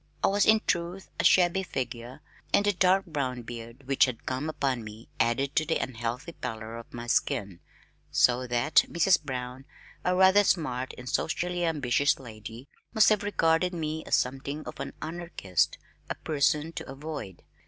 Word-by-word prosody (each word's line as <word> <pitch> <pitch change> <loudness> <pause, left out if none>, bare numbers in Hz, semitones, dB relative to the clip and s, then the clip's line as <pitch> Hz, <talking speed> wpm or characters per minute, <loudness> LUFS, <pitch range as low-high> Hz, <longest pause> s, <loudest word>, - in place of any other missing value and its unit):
I - - +5
was 200 +1 +2
in 220 0 +6
truth 175 +2 -2
a - - +1
shabby 180 +1 +5
figure, 125 -7 -5 0.3
and 200 - +3
the 205 - +3
dark 190 +1 +3
brown 130 -7 -3
beard 115 +2 -9
which 135 0 +4
had 125 -3 -6
come 130 +4 -2
upon 135 -6 -1
me 110 +1 -11
added 135 +5 +1
to 160 - +5
the 160 +1 0
unhealthy 120 +5 -4
pallor 110 -6 -6
of 115 0 -10
my 120 0 -7
skin, 100 -5 0 0.5
so 125 +1 +3
that 120 +6 -1
Mrs. 170 +1 +3
Brown, 130 -2 -5 0.4
a 180 - +2
rather 190 +2 +6
smart 130 -9 0
and 125 - -9
socially 175 +5 -1
ambitious 145 -3 +2
lady, 115 +1 -10 0.3
must 220 - +6
have 210 -2 +3
regarded 180 -3 +1
me 160 -1 -3
as - - +2
something 135 +4 -2
of - - -8
an 140 - -5
anarchist, 160 - -1 0.3
a - - -2
person 150 +1 0
to 165 - -7
avoid. 135 - -7
140 Hz, 165 wpm, -28 LUFS, 120-170 Hz, 0.5 s, in